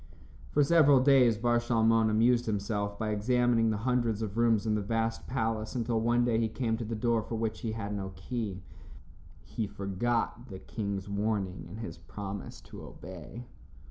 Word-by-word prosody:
For 145 - +3
several 145 -3 +6
days 130 -4 +5
Bar 120 +1 +2
Shalmon 115 -1 +3
amused 115 +3 +3
himself 100 -1 -2
by 110 0 -2
examining 115 +1 +2
the 110 - 0
hundreds 115 -2 0
of 105 -1 -4
rooms 115 -2 +3
in 110 - +1
the 105 - 0
vast 115 +2 -2
palace 110 -4 -2
until 115 -2 0
one 120 +1 +2
day 115 -2 +2
he 115 - +2
came 115 0 -1
to 120 - -4
the 115 +1 -4
door 115 +1 +1
for 115 - -5
which 110 -1 -2
he 115 -3 -2
had 105 -2 -4
no 95 -1 -4
key. 95 -1 -4 0.8
He 110 - -4
forgot 110 +5 -2
the 95 - -7
king's 100 -1 -4
warning 100 -3 -2
and 105 +6 -8
his 110 - -7
promise 100 -1 -7
to - - -11
obey. 95 +7 -10
110 Hz, 175 wpm, -30 LUFS, 105-120 Hz, 0.8 s, several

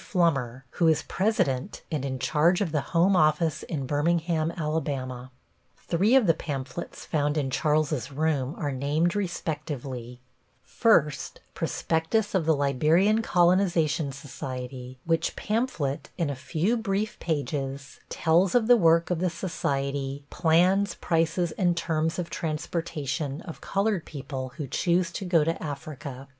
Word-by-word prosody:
Flummer, 135 - 0
who 170 - +2
is 160 -2 +3
President 185 - -1
and 150 -4 -1
in 135 -1 -2
charge 150 +8 +2
of 190 -6 -1
the 150 -2 +1 0.2
home 190 +3 +5
office 155 -1 +2
in 145 -5 -4
Birmingham, 160 +3 +1
Alabama. 135 -5 -3 0.5
Three 200 +9 +2
of 265 -4 +6
the 165 - +5
pamphlets 145 0 -6
found 150 -1 0
in 135 -3 -1
Charles's 150 -3 0
room 145 -1 0
are 145 -3 -2
named 150 +7 0
respectively: 145 - -4 0.4
First, 150 - +2
Prospectus 165 +7 0
of 175 -5 +1
the 160 - +5
Liberian 155 - +3
Colonization 175 -6 +2
Society; 130 -2 -7
which 165 0 0
pamphlet 170 - -2
in 165 -5 0
a - - -4
few 170 - 0
brief 215 -1 -2
pages 140 -3 -3
tells 170 +5 +2
of 240 -3 +4
the 245 +1 +6
work 165 -2 +4
of 175 - 0
the 180 +1 +1
society, 140 -5 -3
plans, 180 +4 +3
prices 165 +1 0
and 175 -3 +2
terms 160 -1 0
of 180 -2 -4
transportation 150 -2 -3
of 165 - -9
colored 200 -3 0
people 130 -3 -6
who 150 - -3
choose 170 +5 +1
to 190 - -5
go 170 -4 +3
to 165 +2 -1
Africa. 140 -3 -7
160 Hz, 140 wpm, -27 LUFS, 140-175 Hz, 0.5 s, of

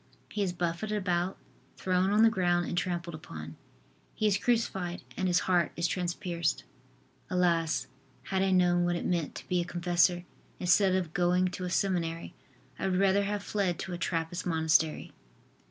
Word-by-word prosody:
He 210 - -3
is 190 -3 +1
buffeted 175 +5 -2
about, 180 -1 -1 0.4
thrown 185 0 +1
on 210 +2 +4
the 225 - +6
ground 175 -3 +1
and - - -3
trampled 175 -1 -2
upon. 80 - -8 0.6
He 215 - -1
is 205 -2 +4
crucified 195 -7 -1
and 185 - -1
His 180 -1 +3
heart 175 -3 +2
is 170 - -1
transpierced. 175 -2 -2 0.7
Alas! 170 -6 +1 0.4
had 190 -1 -1
I 195 - +2
known 180 -1 +3
what 175 0 +1
it 170 - -3
meant 170 -4 -1
to - - -9
be 180 -1 +1
a - - -1
confessor, 175 +1 +1 0.3
instead 185 +1 +4
of 175 -4 -2
going 180 +1 +2
to 180 0 -5
a - - -3
seminary 175 -3 -1 0.5
I 195 - -1
would 185 -1 +1
rather 195 +1 +3
have 205 0 -2
fled 195 -6 -1
to 185 - -5
a - - -3
Trappist 165 +1 -2
Monastery." 160 -2 +1
180 Hz, 170 wpm, -30 LUFS, 170-190 Hz, 0.7 s, the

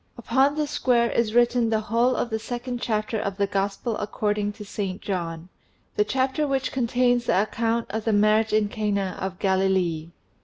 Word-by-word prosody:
Upon 265 +4 +2
this 300 -1 -2
square 240 -5 +2
is 230 -1 0
written 240 -1 +3
the 220 -1 +1
whole 235 +4 +1
of 240 - -2
the 220 - -1
second 245 +1 -5
chapter 215 0 -1
of 200 -2 -3
the 200 - +2
Gospel 200 +3 -2
according 210 0 -1
to 210 - -10
St. 195 -1 -4
John 170 -3 -4 0.5
the 210 - +3
chapter 265 +6 0
which 270 -1 -1
contains 245 -1 +1
the 185 - +3
account 230 +1 -1
of 220 +1 -3
the 225 - +2
marriage 215 +1 +3
in 215 -1 +3
Cana 200 -3 -2
of 190 -1 -3
Galilee. 190 -4 +1
215 Hz, 180 wpm, -25 LUFS, 200-240 Hz, 0.5 s, written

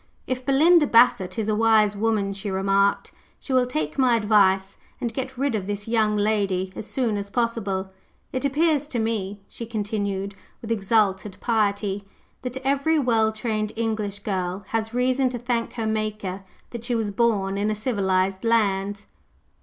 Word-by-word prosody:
"If 255 0 -3
Belinda 305 +3 +5
Bassett 210 -7 +4
is 220 -2 -1
a 215 - +1
wise 215 -1 +4
woman," 205 -2 0
she 200 +1 -5
remarked, 195 +1 +1 0.3
"she 270 - -5
will 255 -1 +3
take 155 - -3
my 255 -3 +4
advice, 200 -3 +2 0.2
and 235 -2 -3
get 260 +1 -5
rid 275 0 0
of 200 -3 -2
this 205 +1 -4
young 215 -2 +2
lady 200 -3 0
as 215 - -6
soon 235 -6 0
as 200 0 -5
possible. 200 -5 -1 0.4
It 255 - -2
appears 295 +1 +2
to 270 - -4
me," 210 -3 -2
she 230 - -8
continued, 205 -3 -2 0.3
with 230 - -7
exalted 205 -2 +1
piety, 205 -3 0 0.4
"that 250 0 -4
every 280 +4 +2
well 225 -6 +2
trained 215 -1 -2
English 215 -3 -2
girl 185 -1 -2
has 225 -1 -1
reason 255 +2 +1
to 250 - -4
thank 240 -1 -2
her 225 -2 -3
Maker 215 -3 -2 0.3
that 235 -2 -7
she 240 0 -1
was 220 -3 -1
born 200 -3 +1
in 205 +2 0
a 215 - 0
civilized 195 -4 0
land." 205 -3 +1
215 Hz, 165 wpm, -24 LUFS, 200-235 Hz, 0.4 s, Belinda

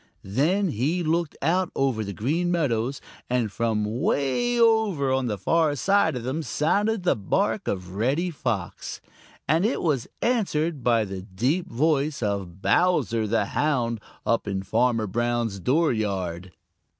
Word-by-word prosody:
Then 160 - +1
he 155 +9 0
looked 165 0 0
out 180 +4 +1
over 130 -5 +1
the 100 - -5
Green 150 - -1
Meadows, 135 -6 0 0.3
and 120 -4 0
from 110 -1 0 0.2
way 240 - +1
over 215 - +3
on 130 -1 0
the 105 -3 -2
far 155 - +2
side 195 -1 +2
of 125 - -4
them 130 +6 -2
sounded 200 +7 0
the 180 - +3
bark 195 - -1
of 90 -2 -3
Reddy 135 - 0
Fox, 115 - -4 0.5
and 160 +4 +3
it 225 +5 +1
was 145 -8 0 0.2
answered 170 - 0
by 115 -2 +3
the 95 -1 -6
deep 125 - -1
voice 145 0 +1
of 100 -3 -3
Bowser 130 -11 +2
the 110 -1 +1
Hound 120 -4 0 0.2
up 115 -2 +1
in 95 -1 -2
Farmer 115 +2 +1
Brown's 120 -1 -1
dooryard. 100 - 0
130 Hz, 145 wpm, -25 LUFS, 110-165 Hz, 0.5 s, over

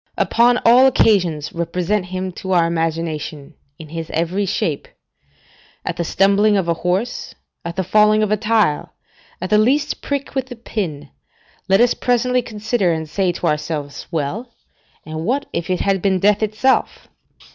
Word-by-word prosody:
Upon 240 +1 +3
all 250 +3 +7
occasions 180 - +2
represent 180 +3 -1
him 185 +1 -4
to 190 +1 -4
our 170 -2 +4
imagination 160 -3 -3 0.2
in 155 -2 -11
his 165 0 -6
every 180 +5 -1
shape; 165 -6 -2 1.0
at - - -2
the 170 - -1
stumbling 200 +4 +3
of 185 -3 -1
a 170 - +2
horse, 185 +8 -2 0.3
at 170 0 -5
the 190 - -1
falling 215 +3 +4
of 210 - -1
a - - +4
tile, 215 -8 +1 0.5
at 185 +3 -5
the 210 - +5
least 275 +7 +1
prick 280 -1 -3
with 260 -1 -3
a - - -5
pin, 195 -10 -5 0.6
let 195 - +5
us 245 0 +4
presently 250 +1 +1
consider, 215 -4 -1
and 160 -1 -3
say 185 +3 0
to - - -5
ourselves, 150 -1 -3
"Well, 170 - -3 0.6
and 155 0 -5
what 265 +9 0
if 170 +1 -3
it 185 - 0
had 195 -2 +1
been 190 -1 +2
death 205 +3 +2
itself?" 215 +5 0
190 Hz, 165 wpm, -19 LUFS, 165-215 Hz, 1.0 s, all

